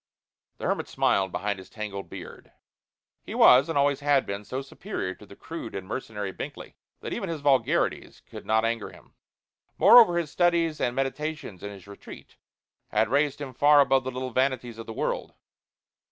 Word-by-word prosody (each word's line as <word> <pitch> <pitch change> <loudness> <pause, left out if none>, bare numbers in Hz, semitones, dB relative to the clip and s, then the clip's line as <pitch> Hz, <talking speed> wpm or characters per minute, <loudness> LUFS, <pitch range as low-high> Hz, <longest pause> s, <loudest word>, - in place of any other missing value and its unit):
The - - -6
hermit - - -1
smiled 95 -1 +1
behind 100 0 -2
his 95 - -13
tangled 105 -2 -6
beard. - - -10 0.7
He - - -8
was 130 +5 +6
and 165 - -1
always 140 0 +2
had 145 -2 +2
been 100 +1 -5
so 130 +6 -5
superior 135 - -5
to 105 - -16
the 100 - -13
crude 160 -5 -8
and 95 -1 -6
mercenary 105 -4 -5
Binkley - - -8 0.3
that - - -5
even - - -4
his 160 -3 -4
vulgarities 140 -2 +1
could - - -10
not 110 +1 +2
anger 115 -1 -2
him. - - -18 0.6
Moreover, 220 -8 +7
his 165 -4 -2
studies 170 -3 +1
and 120 - 0
meditations 135 - -4
in 100 - -6
his 100 -3 -12
retreat 100 0 -13 0.5
had 110 +1 +1
raised 145 +2 +1
him 135 -3 -6
far 145 +3 +5
above 135 -1 +4
the 130 - -3
little 130 0 -5
vanities 130 -2 -1
of 115 - -8
the - - -6
world. - - -3
130 Hz, 180 wpm, -26 LUFS, 105-145 Hz, 0.7 s, Moreover